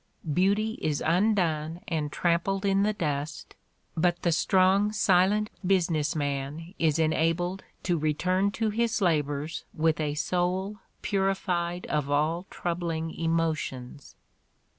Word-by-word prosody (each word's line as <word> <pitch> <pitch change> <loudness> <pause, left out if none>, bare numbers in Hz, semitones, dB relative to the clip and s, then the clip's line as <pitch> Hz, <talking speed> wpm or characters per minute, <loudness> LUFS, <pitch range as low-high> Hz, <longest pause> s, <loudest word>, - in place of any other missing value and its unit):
Beauty 205 +6 +1
is 150 -2 -1
undone 170 -3 +1
and 155 -3 -2
trampled 180 +5 0
in 195 0 +3
the 210 +1 +3
dust, 150 -5 -3 0.4
but 175 +1 +1
the 170 - +3
strong, 190 +5 +3
silent 205 +1 +3
business 165 -5 +1
man 145 +3 -3
is 160 -2 +2
enabled 165 +3 +1 0.2
to 175 -3 +1
return 180 +6 +1
to 220 +1 -1
his 230 +2 0
labors 150 -3 0
with 160 0 +1
a 150 -1 -1
soul 185 +5 -1 0.3
purified 185 -3 -1
of 150 -2 -1
all 155 +5 0
troubling 170 -2 -3
emotions. 155 -5 -2
170 Hz, 120 wpm, -27 LUFS, 155-190 Hz, 0.4 s, in